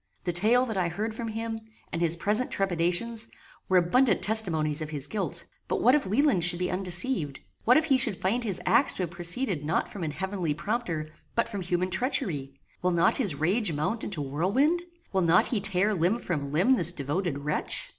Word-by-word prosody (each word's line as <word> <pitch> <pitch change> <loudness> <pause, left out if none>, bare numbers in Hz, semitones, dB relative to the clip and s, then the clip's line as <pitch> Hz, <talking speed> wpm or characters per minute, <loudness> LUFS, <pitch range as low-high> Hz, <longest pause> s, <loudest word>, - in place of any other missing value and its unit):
The 175 - -2
tale 225 +8 +3
that 220 -5 -4
I 180 -2 +1
heard 210 +6 -4
from 230 +1 -5
him, 225 0 -4 0.3
and 165 - -2
his 170 -1 +3
present 210 +8 +1
trepidations, 195 +5 +1 0.4
were 190 - +4
abundant 195 +5 +2
testimonies 165 -9 +2
of 155 - -5
his 145 -3 -4
guilt. 170 -3 -4 0.2
But - - -1
what 250 - +4
if 295 -8 +1
Wieland 225 - +2
should 175 0 +5
be 180 0 -2
undeceived! 180 - +1 0.3
What 250 +4 +6
if 315 - +2
he 270 -4 +2
shall 200 - 0
find 215 +8 -1
his 200 -6 -1
acts 280 - +3
to 185 - -2
have 170 - -5
proceeded 175 - +1
not 155 +3 -1
from 200 - -8
an 160 - -2
heavenly 180 -1 -3
prompter, 170 -3 -3 0.3
but 230 - +1
from 200 -3 -5
human 180 +1 -2
treachery! 190 - -1 0.3
Will 180 - +1
not 170 -1 +2
his 200 - -1
rage 180 +5 +1
mount 185 +10 -2
into 165 -8 -3
whirlwind? 200 - +1 0.3
Will 190 - +2
not 170 +1 +4
he 220 -5 -1
tare 195 +1 +2
limb 185 +4 +1
from 150 -11 -4
limb 195 - +3
this 170 -3 +3
devoted 155 +1 -3
wretch? 150 +2 -2
185 Hz, 200 wpm, -27 LUFS, 170-225 Hz, 0.4 s, What